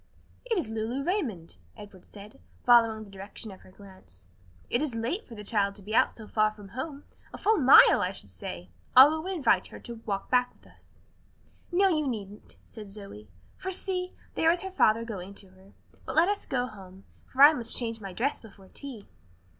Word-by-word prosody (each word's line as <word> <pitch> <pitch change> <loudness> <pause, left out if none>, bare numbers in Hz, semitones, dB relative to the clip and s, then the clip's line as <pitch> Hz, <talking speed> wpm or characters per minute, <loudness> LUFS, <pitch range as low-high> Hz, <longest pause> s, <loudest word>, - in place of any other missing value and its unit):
"It 460 -4 0
is 340 - -1
Lulu 225 +5 -3
Raymond," 240 - -3 0.2
Edward 200 -3 -13
said, 205 - -13 0.3
following 230 -2 +5
the 200 - -14
direction 200 +2 -8
of 190 - -13
her - - -18
glance. 185 - -16 0.4
"It 240 - 0
is 290 -6 -1
late 235 - -3
for 230 - -11
the 210 - -9
child 200 -2 0
to 200 - -11
be 210 +3 -7
out - - +4
so 220 -2 -12
far 215 0 +2
from 205 -2 -13
home; 280 +4 -6 0.3
a - - -8
full 435 +2 +2
mile 270 -2 +7
I 180 - 0
should 100 - -9
say. 85 0 -8 0.3
I'll 300 +5 +8
go 345 - -8
and 380 - -2
invite 280 -9 +2
her - - -11
to 235 -1 -9
walk 200 -2 -3
back 250 -1 +2
with - - -27
us." - - -18 0.7
"No, 385 +3 +4
you 305 -5 +1
needn't," 210 -4 -7
said 215 -3 -11
Zoe, 195 - -11 0.3
"for 380 - -5
see, 365 -1 -2 0.2
there 325 - +2
is 345 +2 +1
her 380 - -5
father 230 - +3
going 200 -3 -7
to 195 -1 -10
her. 190 +1 -21 0.3
But 265 - -4
let 330 +3 +5
us 410 0 -2
go 250 -2 0
home, 195 -4 -12 0.2
for 265 +2 +4
I 295 +2 +10
must 235 -5 -1
change 230 -2 -3
my 195 -2 -7
dress 255 +10 -2
before 195 -4 -16
tea." 260 -7 -8
225 Hz, 210 wpm, -28 LUFS, 200-280 Hz, 0.7 s, I